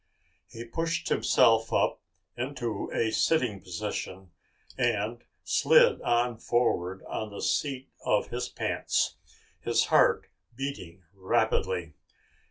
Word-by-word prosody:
He 115 Hz, +1 st, -9 dB
pushed 165 Hz, +7 st, -2 dB
himself 115 Hz, 0 st, +3 dB
up -, -, +1 dB, 0.3 s
into 120 Hz, -4 st, -3 dB
a 110 Hz, -1 st, 0 dB
sitting 120 Hz, -7 st, +1 dB
position 95 Hz, -1 st, -5 dB, 0.4 s
and 115 Hz, +4 st, -1 dB, 0.2 s
slid 485 Hz, -1 st, +4 dB
on 120 Hz, -1 st, +1 dB
forward 95 Hz, -6 st, 0 dB
on 110 Hz, -, -4 dB
the 100 Hz, -, -7 dB
seat 135 Hz, -2 st, -1 dB
of 105 Hz, -, +1 dB
his 125 Hz, +1 st, -3 dB
pants, -, -, -1 dB, 0.4 s
his -, -, +1 dB
heart -, -, +4 dB, 0.3 s
beating 105 Hz, -10 st, -6 dB
rapidly. 90 Hz, -3 st, 0 dB
115 Hz, 105 wpm, -28 LUFS, 100-130 Hz, 0.4 s, slid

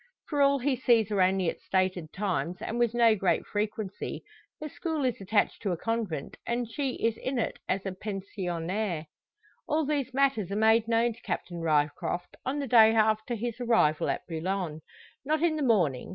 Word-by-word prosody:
For 290 Hz, -2 st, +1 dB
all 280 Hz, 0 st, +5 dB
he 270 Hz, +1 st, 0 dB
sees 230 Hz, -4 st, +3 dB
her 205 Hz, -3 st, +1 dB
only 185 Hz, -1 st, +2 dB
at -, -, -3 dB
stated 185 Hz, -4 st, -1 dB
times, 180 Hz, -4 st, -2 dB
and 235 Hz, -, -4 dB
with 240 Hz, -1 st, +2 dB
no 230 Hz, -2 st, +5 dB
great 190 Hz, -3 st, +1 dB
frequency. 210 Hz, -1 st, -4 dB, 0.4 s
Her 305 Hz, -, -5 dB
school 310 Hz, -1 st, -3 dB
is 250 Hz, -5 st, -1 dB
attached 205 Hz, +2 st, +1 dB
to 195 Hz, -4 st, 0 dB
a -, -, -3 dB
convent, 220 Hz, -9 st, -3 dB
and 240 Hz, 0 st, -1 dB
she 265 Hz, +3 st, -2 dB
is 225 Hz, 0 st, 0 dB
in 260 Hz, 0 st, -3 dB
it 230 Hz, -, -2 dB
as 190 Hz, +1 st, -1 dB
a 195 Hz, -, -2 dB
pensionnaire. 185 Hz, -2 st, -3 dB, 0.6 s
All 310 Hz, 0 st, +1 dB
these 280 Hz, -3 st, -1 dB
matters 265 Hz, -7 st, +1 dB
are 200 Hz, -, -3 dB
made 220 Hz, +1 st, +4 dB
known 230 Hz, +1 st, +2 dB
to -, -, -19 dB
Captain 175 Hz, -1 st, -4 dB
Ryecroft 155 Hz, +2 st, 0 dB
on 265 Hz, +3 st, -2 dB
the 285 Hz, -, -2 dB
day 225 Hz, -3 st, +6 dB
after 220 Hz, +2 st, +2 dB
his 235 Hz, +1 st, -4 dB
arrival 225 Hz, -11 st, +2 dB
at -, -, -2 dB
Boulogne. 170 Hz, -1 st, -3 dB, 0.4 s
Not 310 Hz, +3 st, 0 dB
in 335 Hz, -2 st, +3 dB
the 305 Hz, -, -2 dB
morning. 180 Hz, -, +2 dB
220 Hz, 185 wpm, -28 LUFS, 185-245 Hz, 0.6 s, day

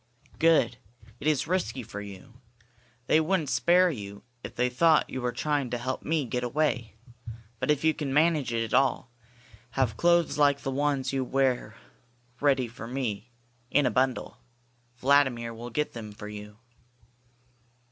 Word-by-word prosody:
"Good! 165 Hz, -7 st, +4 dB, 0.4 s
It -, -, -3 dB
is 150 Hz, -2 st, +2 dB
risky 170 Hz, -7 st, -1 dB
for 105 Hz, -2 st, -7 dB
you. 105 Hz, +5 st, -12 dB, 0.6 s
They 155 Hz, -, +4 dB
wouldn't 160 Hz, -3 st, 0 dB
spare 180 Hz, +1 st, +4 dB
you 100 Hz, -6 st, -8 dB, 0.2 s
if -, -, -8 dB
they 125 Hz, -, +2 dB
caught 160 Hz, +5 st, +4 dB
you 125 Hz, -1 st, -2 dB
trying 145 Hz, -1 st, -1 dB
to 120 Hz, -, -2 dB
help 130 Hz, +2 st, -3 dB
me 160 Hz, -1 st, 0 dB
to -, -, -7 dB
get 125 Hz, 0 st, -1 dB
away. 125 Hz, -4 st, -1 dB, 0.6 s
But -, -, -2 dB
if 150 Hz, -1 st, +2 dB
you 160 Hz, 0 st, +4 dB
can 145 Hz, -3 st, -4 dB
manage 150 Hz, -3 st, +2 dB
it 115 Hz, -1 st, 0 dB
at 115 Hz, -, -6 dB
all, 130 Hz, -1 st, +2 dB, 0.7 s
have 120 Hz, -5 st, +1 dB
clothes 170 Hz, -2 st, +3 dB
like 140 Hz, -1 st, +4 dB
the 135 Hz, -, -3 dB
ones 140 Hz, -1 st, 0 dB
you 135 Hz, -1 st, 0 dB
wear 130 Hz, -4 st, 0 dB, 0.6 s
ready 135 Hz, -4 st, +2 dB
for 115 Hz, 0 st, -9 dB
me, 120 Hz, -3 st, -3 dB, 0.4 s
in 145 Hz, +1 st, +3 dB
a -, -, +2 dB
bundle. 130 Hz, 0 st, 0 dB, 0.6 s
Vladimir 130 Hz, -4 st, +2 dB
will 120 Hz, +2 st, -8 dB
get 150 Hz, +6 st, -2 dB
them 110 Hz, -3 st, -7 dB
for 105 Hz, 0 st, -9 dB
you." 105 Hz, 0 st, -9 dB
130 Hz, 160 wpm, -28 LUFS, 120-150 Hz, 0.7 s, Good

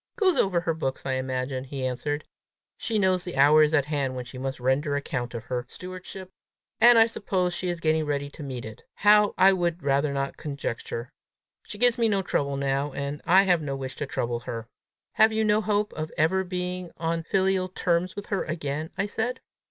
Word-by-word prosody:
"Goes 375 Hz, -5 st, +3 dB
over 180 Hz, -3 st, +2 dB
her 170 Hz, -1 st, 0 dB
books, 135 Hz, -4 st, -3 dB
I 135 Hz, -, 0 dB
imagine," 130 Hz, 0 st, -2 dB
he 135 Hz, -1 st, -5 dB
answered. 145 Hz, +4 st, -2 dB, 0.5 s
"She 225 Hz, -, -2 dB
knows 185 Hz, -3 st, +2 dB
the 180 Hz, -6 st, -6 dB
hour 145 Hz, +3 st, +7 dB
is 150 Hz, -1 st, +4 dB
at 145 Hz, -3 st, +3 dB
hand 140 Hz, -3 st, -1 dB
when 125 Hz, -1 st, -5 dB
she 125 Hz, +1 st, -9 dB
must 135 Hz, 0 st, -4 dB
render 135 Hz, +4 st, +1 dB
account 125 Hz, -4 st, -3 dB
of 115 Hz, -, -5 dB
her 125 Hz, 0 st, -3 dB
stewardship, 185 Hz, +1 st, -8 dB, 0.5 s
and 240 Hz, 0 st, +8 dB
I 225 Hz, -, +8 dB
suppose 190 Hz, -5 st, -1 dB
she 180 Hz, +1 st, -2 dB
is 175 Hz, -1 st, -3 dB
getting 160 Hz, -1 st, +2 dB
ready 145 Hz, -1 st, -1 dB
to 145 Hz, -, -12 dB
meet 130 Hz, -4 st, -5 dB
it; 110 Hz, -1 st, -9 dB
how, 210 Hz, 0 st, +5 dB
I 190 Hz, +1 st, +6 dB
would 175 Hz, -2 st, -1 dB
rather 140 Hz, +1 st, +2 dB
not 140 Hz, 0 st, -2 dB
conjecture. 125 Hz, -4 st, -5 dB, 0.6 s
She 205 Hz, -, -8 dB
gives 245 Hz, +1 st, +3 dB
me 230 Hz, -1 st, +3 dB
no 200 Hz, -2 st, +1 dB
trouble 140 Hz, -5 st, -1 dB
now, 140 Hz, +1 st, 0 dB
and 140 Hz, +1 st, -4 dB
I 190 Hz, +3 st, +7 dB
have 180 Hz, -4 st, +3 dB
no 140 Hz, -2 st, -3 dB
wish 135 Hz, -1 st, -6 dB
to 145 Hz, -, -3 dB
trouble 120 Hz, -2 st, -2 dB
her." 115 Hz, -1 st, -6 dB, 0.4 s
"Have 220 Hz, +1 st, +5 dB
you 220 Hz, 0 st, +1 dB
no 210 Hz, 0 st, +3 dB
hope 210 Hz, -1 st, 0 dB
of 155 Hz, 0 st, -5 dB
ever 190 Hz, +5 st, +2 dB
being 180 Hz, -1 st, -4 dB
on 165 Hz, 0 st, -1 dB
filial 190 Hz, +2 st, +1 dB
terms 180 Hz, 0 st, 0 dB
with 205 Hz, -, -6 dB
her 200 Hz, -, -1 dB
again?" 155 Hz, -1 st, -3 dB
I 200 Hz, -, +1 dB
said. 235 Hz, +5 st, -2 dB
160 Hz, 205 wpm, -26 LUFS, 135-190 Hz, 0.6 s, and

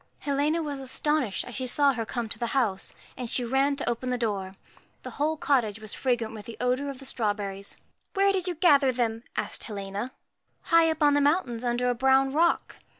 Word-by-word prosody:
USCHKA -, -, -36 dB
Helena 295 Hz, +3 st, +1 dB
was 290 Hz, -2 st, -4 dB
astonished 265 Hz, -3 st, -1 dB
as 245 Hz, -, -9 dB
she 255 Hz, +1 st, -3 dB
saw 280 Hz, +2 st, +3 dB
her 230 Hz, -3 st, -4 dB
come 240 Hz, -2 st, -3 dB
to -, -, -6 dB
the 235 Hz, -, -1 dB
house, 210 Hz, -7 st, 0 dB, 0.2 s
and 245 Hz, -2 st, -5 dB
she 250 Hz, -, +1 dB
ran 270 Hz, +3 st, +2 dB
to -, -, -4 dB
open 240 Hz, +2 st, -1 dB
the 250 Hz, -, 0 dB
door. 200 Hz, -5 st, -2 dB, 0.5 s
The -, -, -7 dB
whole 310 Hz, +2 st, -1 dB
cottage 235 Hz, -8 st, +1 dB
was 215 Hz, -1 st, -2 dB
fragrant 240 Hz, -4 st, -1 dB
with 215 Hz, -2 st, -9 dB
the 230 Hz, -, -8 dB
odour 255 Hz, +3 st, 0 dB
of 275 Hz, -, -6 dB
the 270 Hz, -, -11 dB
strawberries. 205 Hz, -5 st, -3 dB, 0.4 s
'Where 395 Hz, 0 st, +4 dB
did 375 Hz, -2 st, 0 dB
you 355 Hz, -, -1 dB
gather 290 Hz, -5 st, +5 dB
them?' 230 Hz, -2 st, -1 dB
asked 215 Hz, -1 st, -1 dB
Helena. 200 Hz, +2 st, -4 dB
1 -, -, -28 dB, 0.6 s
High 330 Hz, -1 st, +6 dB
up 315 Hz, -1 st, 0 dB
on 290 Hz, -1 st, +5 dB
the 290 Hz, -, +3 dB
mountains, 280 Hz, -6 st, +1 dB
under 245 Hz, 0 st, 0 dB
a 245 Hz, -, +3 dB
brown 265 Hz, +2 st, +3 dB
rock.' 335 Hz, +3 st, +1 dB
255 Hz, 215 wpm, -27 LUFS, 225-285 Hz, 0.6 s, High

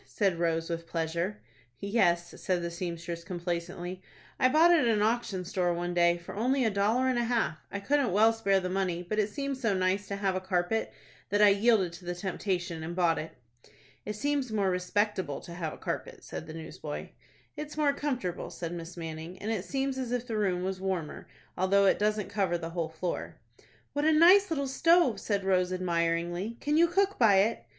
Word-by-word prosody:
said 195 Hz, -5 st, 0 dB
Rose, 165 Hz, -1 st, 0 dB
with 165 Hz, -1 st, -4 dB
pleasure. 170 Hz, +5 st, -2 dB, 0.4 s
"Yes," 175 Hz, -5 st, +1 dB
said 180 Hz, -2 st, 0 dB
the 170 Hz, -, -3 dB
seamstress, 170 Hz, -1 st, -5 dB
complacently; 175 Hz, +1 st, -4 dB, 0.4 s
"I 255 Hz, -, +5 dB
bought 320 Hz, +5 st, +6 dB
it 340 Hz, -, +6 dB
at 260 Hz, -, +2 dB
an 215 Hz, -2 st, +2 dB
auction 220 Hz, -5 st, 0 dB
store 175 Hz, -1 st, 0 dB
one 175 Hz, +1 st, -3 dB
day, 175 Hz, 0 st, +4 dB
for 175 Hz, -, -10 dB
only 255 Hz, +4 st, +1 dB
a 220 Hz, -, +2 dB
dollar 215 Hz, +6 st, +2 dB
and 255 Hz, -2 st, +1 dB
a -, -, +1 dB
half. 225 Hz, -10 st, 0 dB
I 200 Hz, -, -3 dB
couldn't 275 Hz, 0 st, +1 dB
well 220 Hz, +4 st, +5 dB
spare 200 Hz, -4 st, +2 dB
the 185 Hz, -, -3 dB
money; 180 Hz, -2 st, -1 dB
but 215 Hz, +5 st, -2 dB
it 210 Hz, 0 st, +1 dB
seemed 275 Hz, +4 st, -3 dB
so 225 Hz, -6 st, +1 dB
nice 190 Hz, +2 st, 0 dB
to 200 Hz, -, -3 dB
have 195 Hz, -2 st, 0 dB
a -, -, 0 dB
carpet, 185 Hz, +3 st, -1 dB, 0.4 s
that 205 Hz, +1 st, +3 dB
I 205 Hz, -, +8 dB
yielded 200 Hz, -3 st, +3 dB
to 170 Hz, +1 st, -11 dB
the 175 Hz, 0 st, -3 dB
temptation, 180 Hz, -2 st, -3 dB
and 165 Hz, +2 st, -5 dB
bought 175 Hz, -3 st, +2 dB
it." 160 Hz, -, -6 dB, 0.7 s
"It 210 Hz, -, -4 dB
seems 280 Hz, +1 st, -1 dB
more 200 Hz, -3 st, +1 dB
respectable 185 Hz, -3 st, -1 dB
to 170 Hz, -, -10 dB
have 170 Hz, -3 st, -3 dB
a -, -, -9 dB
carpet," -, -, -5 dB
said 160 Hz, -, -7 dB
the 155 Hz, -, -8 dB
newsboy. 160 Hz, -2 st, -7 dB, 0.5 s
"It's 300 Hz, 0 st, -7 dB
more 295 Hz, -2 st, +3 dB
comfortable," 255 Hz, -, -3 dB
said 170 Hz, -1 st, -5 dB
Miss 170 Hz, +1 st, -7 dB
Manning, 165 Hz, +2 st, -6 dB
"and 215 Hz, +4 st, -4 dB
it 200 Hz, -4 st, -2 dB
seems 270 Hz, -1 st, -2 dB
as 250 Hz, -2 st, -3 dB
if 245 Hz, -1 st, -1 dB
the 230 Hz, -3 st, -4 dB
room 185 Hz, -4 st, 0 dB
was 190 Hz, 0 st, -3 dB
warmer, 185 Hz, -5 st, -3 dB, 0.3 s
although 195 Hz, +2 st, +3 dB
it 195 Hz, -, +3 dB
doesn't 210 Hz, 0 st, 0 dB
cover 190 Hz, -4 st, 0 dB
the 165 Hz, -1 st, -6 dB
whole 165 Hz, -2 st, -2 dB
floor." 165 Hz, +2 st, -4 dB, 0.6 s
"What 290 Hz, +1 st, 0 dB
a 315 Hz, -, +5 dB
nice 365 Hz, +6 st, +7 dB
little 280 Hz, -4 st, -1 dB
stove!" 310 Hz, -, +3 dB
said 200 Hz, -2 st, -1 dB
Rose, 185 Hz, -1 st, +2 dB
admiringly, 175 Hz, +3 st, -1 dB
"Can 295 Hz, +1 st, 0 dB
you 335 Hz, +2 st, +6 dB
cook 390 Hz, +3 st, +1 dB
by 220 Hz, -5 st, +6 dB
it?" 225 Hz, +3 st, -1 dB
190 Hz, 205 wpm, -29 LUFS, 175-230 Hz, 0.7 s, I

